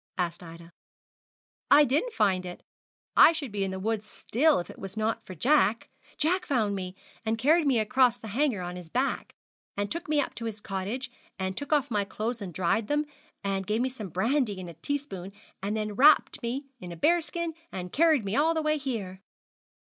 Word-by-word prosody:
asked 175 -1 -2
Ida. 165 0 -12 1.0
'I 295 +1 +8
didn't 300 - 0
find 195 -5 +2
it. 180 -1 -8 0.5
I 330 - +8
should 285 -7 -5
be 200 -1 -1
in 195 - -1
the 190 0 -4
wood 220 +2 -1
still 275 +7 +1
if 175 - -3
it - - -12
was 195 +2 -7
not 220 +1 -1
for 185 - -7
Jack 230 - +2 0.3
Jack 360 +4 +1
found 220 -7 +1
me, 185 -1 -5 0.3
and 225 0 0
carried 300 +6 +3
me 265 -3 +3
across 240 +3 +3
the 225 -2 -9
Hanger 240 -4 0
on 180 0 -5
his 175 -3 -10
back, 260 +8 -1 0.4
and 205 0 -2
took 335 -2 -4
me 305 -1 +3
up 285 - -1
to 230 +1 -6
his 220 -2 -4
cottage, 205 +7 -4 0.3
and 190 -1 -2
took 285 - -6
off 285 -3 +2
my 205 -2 +1
clothes 220 +4 -3
and 190 -3 -5
dried 190 +6 0
them, 295 +1 +1 0.4
and 195 -1 -2
gave 215 +2 +1
me 260 - +1
some 220 -7 -7
brandy 215 - 0
in 180 - -7
a 170 - -8
teaspoon, 195 - -4 0.3
and 205 +3 -2
then 215 -1 -2
wrapped 285 +8 +5
me 255 +4 -3
in 180 -5 -8
a - - -6
bear 340 - +3
skin, 340 0 -3 0.2
and 180 -1 -6
carried 310 -7 +4
me 195 +2 -1
all 320 +3 +3
the 320 - 0
way 305 0 +1
here.' 210 -9 -4
220 Hz, 205 wpm, -28 LUFS, 190-285 Hz, 1.0 s, I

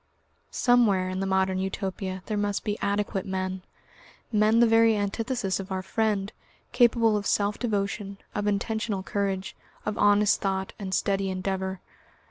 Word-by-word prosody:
Somewhere 215 -7 +3
in 185 0 -3
the 195 - -1
Modern 190 0 +1
Utopia 190 -1 -3
there 215 - -2
must 205 -1 -1
be 210 - -1
adequate 200 -1 -1
men, 190 0 -3 0.7
men 215 +1 +4
the 235 - +7
very 225 -1 +4
antithesis 205 -1 -1
of 195 0 -7
our 190 0 -2
friend, 210 -1 -1 0.4
capable 230 -2 +4
of 205 -1 -1
self 205 0 +1
devotion, 200 -3 -2 0.2
of 205 0 -2
intentional 210 -1 -1
courage, 195 -1 -2 0.3
of 215 - -3
honest 205 0 +4
thought, 190 -1 -2
and 195 -2 -5
steady 195 -1 0
endeavour. 190 0 -3
200 Hz, 145 wpm, -27 LUFS, 190-215 Hz, 0.7 s, the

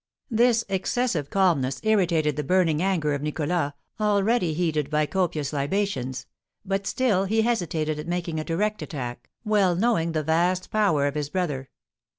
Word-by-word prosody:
This 235 0 +3
excessive 190 - -1
calmness 160 -10 +1
irritated 170 -9 +2
the 150 - -2
burning 165 -1 +2
anger 175 -6 +1
of 140 - -2
Nicholas, 150 0 -1 0.3
already 205 -4 +2
heated 155 -4 0
by 150 0 +2
copious 155 -5 -1
libations; 140 -4 -2 0.4
but 195 0 -2
still 210 -7 +1
he 220 +3 +2
hesitated 165 -9 -1
at 150 - -6
making 170 -2 -2
a - - -2
direct 210 +7 -1
attack, 125 -5 -6 0.2
well 200 -4 +3
knowing 175 -5 +1
the 155 -1 0
vast 175 +4 +1
power 195 -10 +2
of 145 - 0
his 145 -1 -3
brother. 145 -8 -2
170 Hz, 155 wpm, -25 LUFS, 150-200 Hz, 0.4 s, This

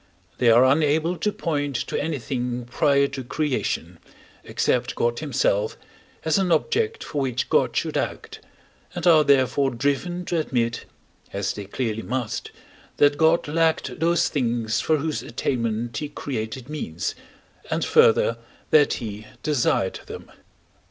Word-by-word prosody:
They 120 - +4
are 120 +3 +7
unable 155 +5 +2
to 210 +6 0
point 145 -7 -2
to - - -3
anything 125 -5 -3
prior 140 +2 +2
to 135 -1 -6
creation, 115 - -2 0.4
except - - 0
God 120 0 0
himself, 120 -8 0 0.5
as 160 +4 +3
an 185 -2 +1
object 445 - +1
for 145 - -3
which 130 -2 -1
God - - +2
should - - -1
act, - - -3 0.6
and - - -3
are 160 -3 +7
therefore 135 -1 +3
driven 145 +8 -1
to 170 -1 0
admit 120 -6 -1 0.5
(as - - -2
they 105 - -7
clearly 110 +1 -3
must), 125 -2 -3 0.5
that 145 0 +5
God 160 +2 +3
lacked 160 +1 0
those 170 +1 +2
things 120 -4 0
for 155 - +2
whose 155 +1 -2
attainment 115 -2 -2
he 150 - -3
created 130 -3 -5
means, 140 - -4 0.6
and - - 0
further 115 - +4 0.3
that 145 -2 +5
he 110 -2 -6 0.2
desired 125 -9 +1
them. - - -9
140 Hz, 140 wpm, -24 LUFS, 120-155 Hz, 0.6 s, are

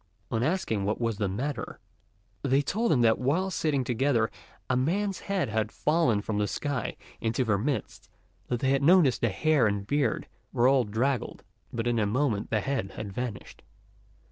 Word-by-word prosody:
On 115 - 0
asking 130 - 0
what 105 +2 -1
was 115 -3 -1
the 105 - +1
matter, 130 +10 -4 0.6
they 135 +1 +2
told 225 - 0
him 130 - +4
that 115 -1 +4
while 165 +9 +1
sitting 150 -6 0
together 120 -2 +1 0.4
a 130 - +1
man's 185 +9 0
head 195 - -1
had 110 0 -1
fallen 145 -10 +1
from 105 -2 -2
the 105 - +1
sky 140 +1 -3 0.2
into 115 +3 0
their 105 -5 +1
midst; 135 +5 -3 0.4
that 120 - -2
they 130 - +2
had 135 0 +2
noticed 155 -4 +5
the 115 - +3
hair 145 +4 +3
and 100 -1 -1
beard 140 -1 0 0.2
were 120 +1 +3
all 130 -2 +4
draggled, 120 +5 -1 0.3
but 115 0 -3
in 120 -1 +1
a 105 - +2
moment 115 -2 0
the 110 -2 +1
head 135 -9 -2
had 100 -2 -6
vanished. 120 -2 -5
125 Hz, 180 wpm, -28 LUFS, 110-145 Hz, 0.6 s, noticed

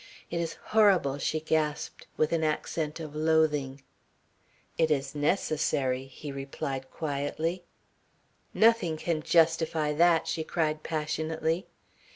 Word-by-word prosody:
"It 170 - -1
is 165 -1 -3 0.2
horrible," 190 -10 +4
she 155 - 0
gasped 155 -1 -2
with 155 +1 +1
an 165 -1 +1
accent 155 0 -2
of 155 -2 -7
loathing. 150 -4 +1 0.9
"It 160 -1 +2
is 140 -3 0
necessary," 145 -4 0
he 135 +2 -8
replied 135 -1 -5
quietly. 155 +4 -3 0.9
"Nothing 220 -8 +3
can 160 0 -1
justify 160 -2 +2
that," 170 +1 +4
she 160 - -1
cried 155 -2 -1
passionately. 160 +2 -2
155 Hz, 115 wpm, -28 LUFS, 145-165 Hz, 0.9 s, horrible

